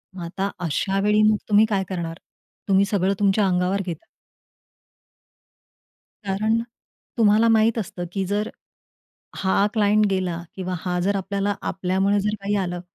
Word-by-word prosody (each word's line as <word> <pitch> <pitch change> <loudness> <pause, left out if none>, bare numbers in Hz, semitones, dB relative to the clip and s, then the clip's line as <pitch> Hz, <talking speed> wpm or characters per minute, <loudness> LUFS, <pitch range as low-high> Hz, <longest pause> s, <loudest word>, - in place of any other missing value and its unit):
मग 180 - -6
आता 190 +3 -3 0.2
अशावेळी 195 +6 +1
मग 215 0 +4
तुम्ही 210 +1 +6
काय 195 -3 +1
करणार. 170 -3 -4 0.5
तुम्ही 195 0 +4
सगळं 195 -1 +1
तुमच्या 200 0 +3
अंगावर 180 +2 +1
घेता. 170 -4 -6 2.2
कारण 215 +4 +1 0.6
तुम्हाला 220 0 +4
माहित 225 +1 +3
असतं 175 -4 -4
की 195 +1 -2
जर 205 +3 -1 0.9
हा 195 +1 +2
क्लायंट 210 0 +3
गेला 180 -3 -1
किंवा 185 -1 -4
हा 180 0 -2
जर 200 +3 +1
आपल्याला, 200 +1 -1
आपल्यामुळे 190 +2 0
जर 210 +1 -1
काही 200 +1 -1
आलं 180 -1 -4
195 Hz, 135 wpm, -23 LUFS, 185-210 Hz, 2.2 s, तुम्ही